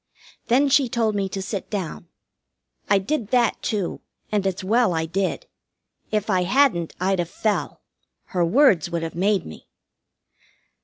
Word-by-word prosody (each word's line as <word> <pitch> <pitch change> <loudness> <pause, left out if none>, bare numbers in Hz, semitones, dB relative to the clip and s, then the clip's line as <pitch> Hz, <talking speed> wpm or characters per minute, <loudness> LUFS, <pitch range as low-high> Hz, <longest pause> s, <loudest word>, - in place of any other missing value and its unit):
Then 260 +5 +4
she 275 -2 +3
told 225 -3 0
me 200 -1 -1
to 195 0 -4
sit 195 0 -5
down. 185 -5 -5 0.8
I - - +5
did 220 +4 -2
that, 240 -1 +1
too, 205 -6 -2 0.3
and 205 -2 +1
it's 190 +1 -3
well 220 -2 +2
I 160 0 0
did. 195 - -2 0.6
If 215 -1 -1
I 185 -4 +2
hadn't 190 - +2
I'd 190 +1 +1
have 170 -1 -1
fell. 215 +1 -2 0.5
Her 180 -2 +2
words 190 - +4
would 170 -1 -2
have 165 - -4
made 195 +3 +1
me. 80 - -11
200 Hz, 155 wpm, -23 LUFS, 180-230 Hz, 0.8 s, I